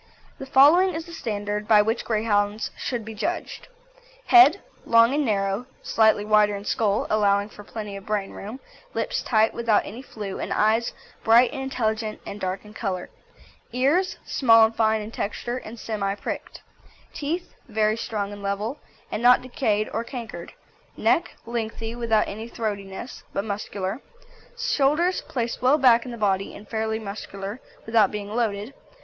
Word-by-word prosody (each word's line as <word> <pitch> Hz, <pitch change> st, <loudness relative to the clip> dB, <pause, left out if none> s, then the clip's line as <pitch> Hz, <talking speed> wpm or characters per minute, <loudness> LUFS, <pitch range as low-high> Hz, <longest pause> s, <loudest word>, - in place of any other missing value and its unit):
The 270 Hz, -, -7 dB
following 315 Hz, +8 st, +6 dB
is 325 Hz, 0 st, -4 dB
the 340 Hz, -, -11 dB
standard 210 Hz, -6 st, -3 dB
by 210 Hz, -2 st, +6 dB
which 225 Hz, +2 st, -1 dB
Greyhounds 210 Hz, -1 st, 0 dB
should 240 Hz, -3 st, -4 dB
be 220 Hz, -, -7 dB
judged. 325 Hz, +12 st, -4 dB, 0.6 s
HEAD 360 Hz, 0 st, +8 dB, 0.2 s
Long 230 Hz, +2 st, +5 dB
and 295 Hz, +1 st, +1 dB
narrow, 200 Hz, 0 st, -1 dB, 0.2 s
slightly 220 Hz, -2 st, +3 dB
wider 210 Hz, -1 st, +4 dB
in 200 Hz, 0 st, -7 dB
skull, 210 Hz, -2 st, +1 dB
allowing 205 Hz, -1 st, +2 dB
for 205 Hz, -, -12 dB
plenty 210 Hz, -1 st, -7 dB
of 195 Hz, +1 st, -10 dB
brain 210 Hz, -2 st, -1 dB
room; 215 Hz, +6 st, -8 dB, 0.4 s
lips -, -, -1 dB
tight, 220 Hz, -2 st, +2 dB
without 230 Hz, -3 st, +2 dB
any 230 Hz, +5 st, -8 dB
flew, 210 Hz, -7 st, -7 dB
and -, -, -4 dB
eyes 220 Hz, +2 st, +2 dB, 0.3 s
bright 235 Hz, +2 st, +6 dB
and 270 Hz, -, -4 dB
intelligent 220 Hz, -4 st, -2 dB
and 205 Hz, -, -7 dB
dark 190 Hz, +2 st, -3 dB
in 210 Hz, -, -13 dB
colour. 190 Hz, -5 st, -4 dB, 0.6 s
EARS 295 Hz, +10 st, +2 dB
Small 225 Hz, -4 st, +5 dB
and 225 Hz, +1 st, -3 dB
fine 220 Hz, -1 st, +2 dB
in 210 Hz, +1 st, -7 dB
texture, 240 Hz, +3 st, -3 dB
and 235 Hz, -2 st, -9 dB
semi 200 Hz, -3 st, -2 dB
pricked. -, -, -6 dB, 0.5 s
TEETH 320 Hz, +5 st, -3 dB, 0.2 s
Very 215 Hz, 0 st, +2 dB
strong 210 Hz, -3 st, -3 dB
and 205 Hz, -, -9 dB
level, 205 Hz, +7 st, -3 dB, 0.3 s
and 210 Hz, -, -2 dB
not 250 Hz, +1 st, +6 dB
decayed 215 Hz, -4 st, 0 dB
or 225 Hz, -, -1 dB
cankered. 230 Hz, -9 st, -7 dB, 0.5 s
NECK 340 Hz, -, +1 dB
Lengthy, 225 Hz, -1 st, -4 dB
without 230 Hz, -3 st, +1 dB
any 220 Hz, +3 st, -6 dB
throatiness, 205 Hz, 0 st, -5 dB
but 200 Hz, -, -2 dB
muscular. 200 Hz, +1 st, -4 dB, 0.6 s
SHOULDERS 335 Hz, -, +2 dB
Placed 235 Hz, -2 st, -2 dB
well 260 Hz, +4 st, +5 dB
back 245 Hz, -4 st, +5 dB
in 250 Hz, -, -6 dB
the 235 Hz, -, -7 dB
body, 195 Hz, -2 st, 0 dB
and 210 Hz, -, -12 dB
fairly 220 Hz, -1 st, -1 dB
muscular, 200 Hz, 0 st, -6 dB, 0.3 s
without 220 Hz, -3 st, +4 dB
being 205 Hz, -1 st, -5 dB
loaded. 220 Hz, 0 st, -1 dB
220 Hz, 160 wpm, -24 LUFS, 205-245 Hz, 0.6 s, HEAD